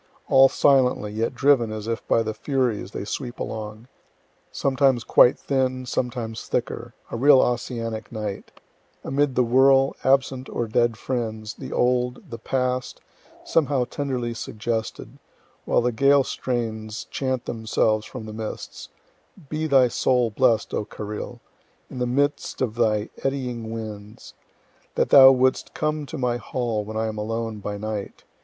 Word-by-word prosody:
All 135 Hz, 0 st, +7 dB
silently, 130 Hz, -8 st, +3 dB
yet 115 Hz, +4 st, -2 dB
driven 135 Hz, -5 st, +3 dB
as 110 Hz, 0 st, -6 dB
if 115 Hz, 0 st, -3 dB
by 115 Hz, -, +3 dB
the 110 Hz, 0 st, -3 dB
furies 125 Hz, -4 st, -1 dB
they 100 Hz, -, -6 dB
sweep 120 Hz, +3 st, -5 dB
along, 110 Hz, +1 st, -6 dB, 0.6 s
sometimes 135 Hz, -3 st, +2 dB
quite 125 Hz, -, +5 dB
thin, 130 Hz, -2 st, -1 dB
sometimes 120 Hz, -3 st, -3 dB
thicker -, -, -3 dB, 0.2 s
a -, -, -3 dB
real 135 Hz, +3 st, +6 dB
Ossianic 115 Hz, -3 st, -2 dB
night 105 Hz, -3 st, -5 dB, 0.5 s
amid 140 Hz, -1 st, 0 dB
the 125 Hz, -, +4 dB
whirl, 135 Hz, +3 st, +4 dB
absent 130 Hz, -1 st, +1 dB
or 120 Hz, -, -2 dB
dead 115 Hz, +1 st, +1 dB
friends, 110 Hz, -4 st, -4 dB
the -, -, -9 dB
old, 125 Hz, 0 st, 0 dB
the 115 Hz, -, -6 dB
past, 125 Hz, +1 st, -2 dB, 0.4 s
somehow 145 Hz, -5 st, +1 dB
tenderly 125 Hz, -4 st, -3 dB
suggested 110 Hz, 0 st, -4 dB, 0.5 s
while -, -, +2 dB
the 125 Hz, +1 st, +1 dB
Gael 140 Hz, +4 st, +4 dB
strains 110 Hz, -4 st, -3 dB
chant 130 Hz, -2 st, -2 dB
themselves 110 Hz, -1 st, 0 dB
from 125 Hz, -2 st, -8 dB
the 110 Hz, -, -8 dB
mists 110 Hz, 0 st, -7 dB, 0.6 s
"Be 155 Hz, +1 st, -2 dB
thy 135 Hz, -4 st, +5 dB
soul 125 Hz, -1 st, +1 dB
blest, 115 Hz, -1 st, +2 dB
O -, -, 0 dB
Carril! 105 Hz, 0 st, -7 dB, 0.5 s
in 125 Hz, -, -6 dB
the 125 Hz, -, 0 dB
midst 145 Hz, +4 st, -1 dB
of 120 Hz, -5 st, -1 dB
thy 110 Hz, -2 st, +1 dB
eddying 125 Hz, -5 st, -3 dB
winds. 110 Hz, -2 st, -8 dB
O -, -, -39 dB, 0.5 s
that -, -, +1 dB
thou 135 Hz, -1 st, +10 dB
wouldst 130 Hz, 0 st, +1 dB
come 155 Hz, -1 st, -2 dB
to 160 Hz, -, -6 dB
my 125 Hz, -2 st, 0 dB
hall 120 Hz, -3 st, -2 dB
when 110 Hz, +1 st, -6 dB
I 110 Hz, -, 0 dB
am 110 Hz, -1 st, -4 dB
alone 115 Hz, 0 st, -3 dB
by 105 Hz, 0 st, -5 dB
night! 105 Hz, -1 st, -5 dB
120 Hz, 150 wpm, -24 LUFS, 110-130 Hz, 0.6 s, thou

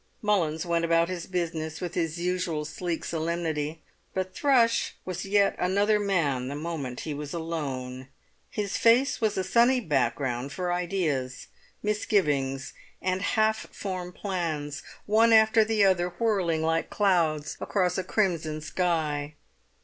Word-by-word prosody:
Mullins 170 Hz, -6 st, +1 dB
went 170 Hz, -1 st, +1 dB
about 165 Hz, 0 st, +3 dB
his 180 Hz, -2 st, -5 dB
business 165 Hz, -3 st, -3 dB
with 175 Hz, -1 st, -4 dB
his 165 Hz, -2 st, -1 dB
usual 175 Hz, -3 st, -1 dB
sleek 165 Hz, +2 st, -4 dB
solemnity. 160 Hz, -2 st, -2 dB, 0.3 s
But 185 Hz, 0 st, -2 dB
Thrush 245 Hz, -2 st, +2 dB
was 185 Hz, 0 st, -4 dB
yet 200 Hz, 0 st, +3 dB
another 205 Hz, +4 st, +2 dB
man 155 Hz, -11 st, 0 dB
the 140 Hz, -, -4 dB
moment 145 Hz, -5 st, -4 dB
he 155 Hz, -, -4 dB
was 145 Hz, +2 st, -5 dB
alone. 135 Hz, -6 st, -4 dB, 0.4 s
His 205 Hz, -2 st, -2 dB
face 240 Hz, +4 st, +4 dB
was 215 Hz, -2 st, +1 dB
a 190 Hz, -, +1 dB
sunny 240 Hz, +7 st, +4 dB
background 135 Hz, -, -1 dB
for 180 Hz, +1 st, -1 dB
ideas, 165 Hz, -8 st, -2 dB, 0.3 s
misgivings, 145 Hz, -11 st, 0 dB, 0.3 s
and 185 Hz, 0 st, -1 dB
half 220 Hz, +1 st, +1 dB
formed 185 Hz, -2 st, -5 dB
plans, 160 Hz, -7 st, -3 dB, 0.2 s
one 225 Hz, +2 st, +4 dB
after 220 Hz, 0 st, +6 dB
the 215 Hz, -1 st, +2 dB
other, 180 Hz, -2 st, +3 dB
whirling 175 Hz, -4 st, 0 dB
like 165 Hz, 0 st, 0 dB
clouds 160 Hz, -7 st, +1 dB
across 180 Hz, -3 st, 0 dB
a -, -, -1 dB
crimson 170 Hz, -6 st, 0 dB
sky. 155 Hz, -3 st, -1 dB
175 Hz, 135 wpm, -27 LUFS, 155-195 Hz, 0.4 s, after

